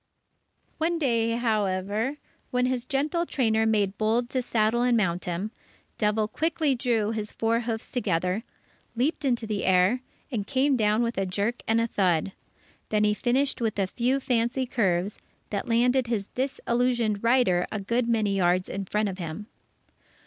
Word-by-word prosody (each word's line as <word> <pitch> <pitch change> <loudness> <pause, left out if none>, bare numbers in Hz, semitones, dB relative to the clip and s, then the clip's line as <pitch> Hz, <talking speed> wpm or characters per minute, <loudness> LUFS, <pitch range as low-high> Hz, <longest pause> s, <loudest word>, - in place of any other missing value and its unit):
One 335 +2 +1
day, 230 -6 +1
however, 215 +2 0 0.3
when 250 0 +1
his 250 -1 -1
gentle 300 +6 0
trainer 220 -4 +1
made 205 -3 +1
bold 230 +3 +1
to 260 - 0
saddle 230 -1 +1
and 245 -1 +3
mount 180 -4 0
him, 180 +5 -3 0.5
Devil 210 0 +1
quickly 315 +2 0
drew 235 -4 0
his 215 -2 -4
four 230 +1 +1
hoofs 225 -2 -4
together, 185 -4 0 0.5
leaped 285 +5 0
into 240 -3 +1
the 210 -2 -2
air, 185 +6 +3 0.3
and 210 -5 -2
came 275 0 +2
down 215 0 +2
with 235 -3 -1
a 195 - 0
jerk 205 +6 -1
and 225 +1 +3
a 230 - +2
thud. 185 -5 +1 0.6
Then 210 -1 +2
he 210 0 +3
finished 250 +6 0
with 225 -3 -1
a 195 - +2
few 245 +7 0
fancy 250 0 0
curves, 200 -6 0 0.3
that 205 +2 -3
landed 245 +2 +3
his 220 -4 -1
disillusioned 240 -4 0
rider 230 -7 +3
a 215 - -2
good 235 +4 0
many 215 -4 +1
yards 180 -1 +2
in 195 0 -4
front 210 +3 0
of 190 -1 -5
him. 170 +4 -5
225 Hz, 165 wpm, -26 LUFS, 205-250 Hz, 0.6 s, and